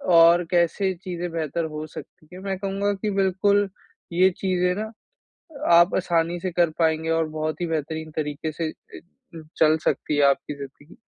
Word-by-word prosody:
और 170 +1 +7
कैसे 180 +2 +2
चीज़ें 175 -2 -4
बेहतर 165 0 -2
हो 155 0 -4
सकती 155 - -12
हैं। 185 - -9
मैं 195 -1 -2
कहूँगा 200 +1 -1
कि 200 +2 -3
बिल्कुल 200 +1 +2 0.5
ये 185 +2 +5
चीज़ें 180 -1 +1
ना, 215 +2 -4 0.8
आप 170 +2 +6
आसानी 175 -1 0
से 185 - -2
कर 170 -1 +3
पाएँगे 160 -1 +1
और 165 0 +2
बहुत 155 +1 -3
ही 175 - 0
बेहतरीन 160 0 -3
तरीके 155 0 -3
से 165 +2 -4 0.3
ए, - - -8 0.6
चल 155 0 +5
सकती 150 - 0
है 145 - +4
आपकी 140 +1 +1
ज़िंदगी। 140 +2 -11
170 Hz, 165 wpm, -24 LUFS, 155-185 Hz, 0.8 s, और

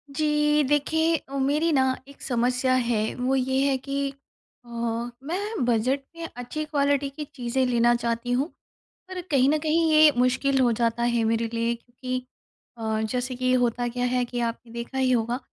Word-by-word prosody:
जी, 300 0 +2
देखिए 315 +4 +2 0.2
ओ - - -2
मेरी 295 +5 +2
ना 265 -2 +4 0.2
एक 280 - -16
समस्या 250 +1 +1 0.2
है 230 -3 +2 0.2
वो 255 +2 0
ये 265 0 +1
है 265 - +1
कि 275 +1 -2 0.6
अ, - - -16 0.5
मैं 370 - -2
बजट 245 +3 +1 0.2
में 335 0 -5
अच्छी 245 +5 -4
क्वालिटी 285 -2 +1
की 295 +2 -7
चीज़ें 255 0 0
लेना 240 -1 +3
चाहती 235 0 -2
हूँ 260 +4 +1 0.6
पर 370 -1 -5
कहीं 270 -1 +4
न 305 - +3
कहीं 320 +1 +2
ये 310 0 +8
मुश्किल 260 +2 +2
हो 245 -2 +4
जाता 235 0 +1
है 235 -1 +2
मेरे 225 +1 +1
लिए 230 +1 0
क्योंकि 250 +2 -6 0.6
अ, 220 -1 -1
जैसे 250 +3 -2
कि 255 0 +1
होता 245 -1 +1
क्या 245 +1 -2
है 250 0 +1
कि 245 0 -5
आपने 235 0 -3
देखा 235 +3 -5
ही 260 -1 +2
होगा 235 0 +1
255 Hz, 180 wpm, -25 LUFS, 240-285 Hz, 0.6 s, ये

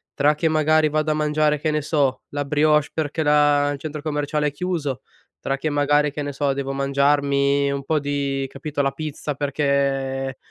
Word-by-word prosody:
tra 145 +1 +3
che 155 +2 0
magari 155 0 +3
vado 155 +1 0
a - - +2
mangiare, 150 0 +1
che 155 - -1
ne 150 0 0
so, 140 -4 0
la 145 0 -3
brioche 150 +1 +2
perché 160 0 -2
la 145 -1 +3
il 145 - -4
centro 150 0 -6
commerciale 150 0 -1
è - - -1
chiuso, 155 -5 -3 0.4
tra 135 - -2
che, 155 +3 -2
magari, 145 0 +2
che 150 0 -4
ne 145 - -4
so, 140 0 0
devo 135 0 -3
mangiarmi 140 0 +2
un 140 0 -3
po' 155 +2 0
di, 140 -1 -2
capito, 145 +1 -4
la 135 - +1
pizza 150 0 -5
perché 135 -2 -1
145 Hz, 190 wpm, -22 LUFS, 140-150 Hz, 0.4 s, tra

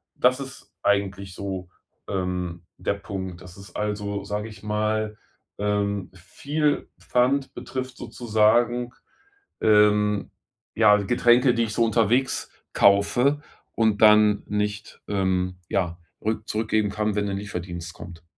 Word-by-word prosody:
Das 130 +1 +3
ist 135 -1 -10
eigentlich 100 -1 0
so, 95 -3 -5 0.4
ähm, 90 -2 -3
der - - -1
Punkt. 95 -3 -6
Dass 90 0 -13
es 100 -2 -13
also, 105 -1 -2
sage 105 +2 -4
ich 105 - -13
mal, 110 0 -1 0.4
ähm, 100 -1 -1
viel 145 - -2
Pfand 130 +3 +1
betrifft 130 0 -6
sozusagen. 120 +2 +1 0.7
Ähm, 105 -1 +3 0.4
ja, 105 -2 +6
Getränke, 120 +4 +4
die 115 -1 +1
ich 105 - -3
so 115 - +2
unterwegs 115 +3 +1 0.2
kaufe 120 +9 +4 0.3
und 110 -2 +1
dann 105 -1 +6
nicht, 105 0 -3
ähm, 95 -2 0
ja 85 -3 -1 0.3
rück 110 0 -2
zurückgeben 110 -1 0
kann, 105 0 -1
wenn 105 - 0
'nen 100 -1 -2
Lieferdienst 90 -4 -6
kommt. 85 0 -11
105 Hz, 125 wpm, -24 LUFS, 100-115 Hz, 0.7 s, ja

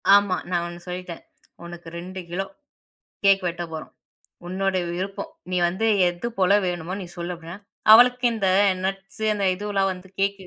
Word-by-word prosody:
ஆமா, 200 -2 +3
நான் 175 -1 0
1 175 0 -8
சொல்லிட்டேன். 180 -1 -6 0.4
உனக்கு 170 -1 -10
2 185 +2 -7
கிலோ 190 +3 -2 0.8
கேக் 195 -1 +5
வெட்டப் 170 -1 -4
போறோம். 160 - -7 0.6
உன்னோட 190 +1 0
விருப்பம், 195 +3 -4 0.2
நீ 180 - +1
வந்து 190 +6 -2 0.2
எதுபோல 195 +1 0
வேணுமோ 175 0 -3
நீ 185 - -6
சொல்லு 175 +1 -3
அப்பிடின்னா, 170 +2 -9 0.3
அவளுக்கு 245 +2 +7
இந்த 205 -4 0 0.4
நட்ஸ் 195 +2 -5
அந்த 200 -2 -1
இதுவெல்லாம் 195 -1 0
வந்து 180 +1 -12
கேக்கு 200 0 0
185 Hz, 150 wpm, -24 LUFS, 175-200 Hz, 0.8 s, அவளுக்கு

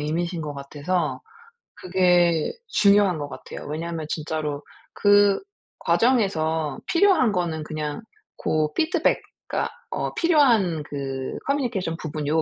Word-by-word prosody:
의미신 170 +3 -2
것 150 -1 -5
같아서 150 +4 -2 0.6
그게 175 -3 +2 0.2
중요한 200 -3 +4
것 145 - -4
같아요. - - -9
왜냐하면 160 +1 -4
진짜로 150 -2 -3 0.3
그 205 -1 +4 0.4
과정에서 160 - +1
필요한 335 - +4
거는 170 -5 -1
그냥 150 +2 -4 0.4
고 155 -1 0
피드백 330 +1 +1 0.3
그니까 - - -1 0.2
어 - - -2
필요한 240 - +3
그 135 -2 -5
커뮤니케이션 240 - -1
부분 155 -1 -4
요 160 +2 +2
165 Hz, 270 characters per minute, -24 LUFS, 150-205 Hz, 0.6 s, 중요한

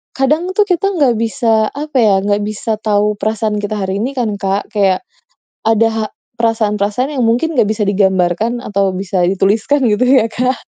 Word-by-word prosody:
kadang 290 +5 +1
tuh 420 - +4
kita 390 -1 0
nggak 280 -7 +3
bisa, 225 -2 +1
apa 295 -1 -4
ya, 215 -3 +4
nggak 205 0 +1
bisa 215 +1 -3
tahu 210 -1 0
perasaan 215 -1 -1
kita 205 +1 -3
hari 190 +1 -2
ini 260 +5 -3
kan, 245 -4 -1
Kak. 195 +2 -2
Kayak 200 - +1 0.6
ada 225 0 +3
ha 220 -1 -2 0.3
perasaan-perasaan 225 +3 0
yang 260 - -1
mungkin 250 +9 +1
nggak 235 - +6
bisa 215 0 -1
digambarkan 190 +3 +1
atau 200 -1 0
bisa 185 -1 -2
dituliskan 200 +9 +1
gitu 210 +3 +1
ya, 255 -3 +4
Kak. 255 +2 0
220 Hz, 175 wpm, -15 LUFS, 205-250 Hz, 0.6 s, nggak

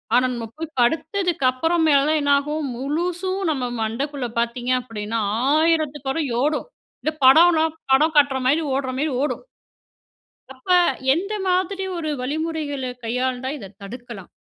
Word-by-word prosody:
ஆனா 250 +1 +4
நம்ம 235 -1 -4
போய் 320 -1 -7
படுத்ததுக்கப்பறமேல 315 0 +2
என்ன 285 0 +1
ஆகும்? 300 +2 -3
முழுசும் 350 +8 -2
நம்ம 270 -4 -2 0.2
மண்டக்குள்ள 265 +4 -2
பாத்தீங்க 240 +1 -1
அப்டின்னா 225 -2 -4 0.4
1000 310 -2 0 0.2
ஓடும். 300 +7 0 0.4
இந்த 310 - +1
படம்னா 320 +4 +7 0.3
படம் 310 +4 +4
காட்ற 280 -2 +4
மாரி, 305 +5 +3
ஓடுற 265 -1 -1
மாரி 305 +2 0
ஓடும். 295 - -2 1.1
அப்ப, 260 +6 -14 0.4
எந்த 390 +7 -2
மாதிரி 380 +1 0
ஒரு 310 -2 -3
வழிமுறைகள 290 -1 -3
கையாண்டா 250 +2 -2
இத 195 -7 -10
தடுக்கலாம்? 230 -2 -9
285 Hz, 120 wpm, -22 LUFS, 255-320 Hz, 1.1 s, படம்னா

